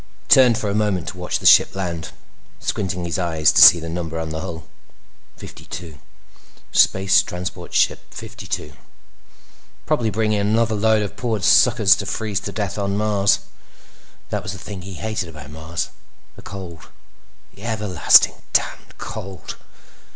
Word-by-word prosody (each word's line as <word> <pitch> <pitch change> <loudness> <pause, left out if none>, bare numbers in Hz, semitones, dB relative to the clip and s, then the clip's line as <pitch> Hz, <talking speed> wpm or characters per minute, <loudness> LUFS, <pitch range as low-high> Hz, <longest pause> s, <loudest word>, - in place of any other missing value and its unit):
He - - -34
turned 125 -4 +6
for 105 - -3
a 100 - -1
moment 105 -4 -1
to 95 - -10
watch 90 - -2
the - - -11
ship - - +6
land, 85 -4 -4 0.5
squinting 90 -3 -3
his 85 +2 -3
eyes 80 -4 +2
to - - +4
see 85 - +10
the 80 - -7
number 80 -1 -4
on 80 -1 -4
the 80 - -4
hull. 80 0 -7 0.7
Fifty - - -12
two. 80 -4 -9 0.7
Space 95 0 +4
Transport 90 0 -7
Ship - - +2
Fifty - - -10
two. - - -4 1.1
Probably 115 -2 0
bringing 110 0 0
another 110 +2 +1
load 110 0 +2
of 100 - -6
poor 115 -4 -2
suckers 100 +2 +5
to 100 - -5
freeze 105 -1 -2
to 100 0 -6
death 100 -1 -4
on 100 0 -1
Mars. 105 -2 +2 0.9
That - - -2
was 95 - -6
the - - -8
thing 95 +1 -8
he 95 +1 -9
hated 110 -3 -4
about 75 -2 -11
Mars—the 80 +2 -8
cold. 90 -5 -10 0.6
The - - -17
everlasting 105 -6 +4 0.2
damned - - -1
cold! 95 -2 -8
95 Hz, 160 wpm, -21 LUFS, 85-105 Hz, 1.1 s, see